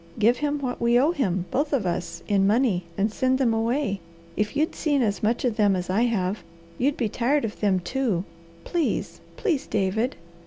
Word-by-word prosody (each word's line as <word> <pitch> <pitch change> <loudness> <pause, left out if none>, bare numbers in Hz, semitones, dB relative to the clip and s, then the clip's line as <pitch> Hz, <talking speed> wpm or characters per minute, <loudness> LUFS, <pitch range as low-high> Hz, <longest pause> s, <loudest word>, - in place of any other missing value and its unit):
Give 230 +3 +4
him 295 +1 -1
what 250 -2 -3
we 235 +1 +4
owe 290 +6 +4
him, 190 - -1
both 290 +3 0
of 245 -8 +1
us, 170 -1 -3
in 195 -2 +3
money, 210 -5 +2
and 205 +2 +1
send 260 +2 +2
them 250 -4 +2
away. 225 -1 0 0.4
If 210 +3 -1
you'd 310 +2 +1
seen 290 -4 +1
as 205 -3 -1
much 230 +4 +1
of 235 -3 0
them 205 -3 +4
as 180 0 -3
I 220 +6 +3
have, 205 -4 0 0.4
you'd 280 +3 +1
be 235 - +1
tired 250 +6 +1
of 210 - -6
them, 195 -3 +2
too. 210 -2 -1 0.4
Please, 340 -3 -2 0.2
please, 315 -10 0
David!" 215 +5 0
230 Hz, 195 wpm, -25 LUFS, 200-265 Hz, 0.4 s, Give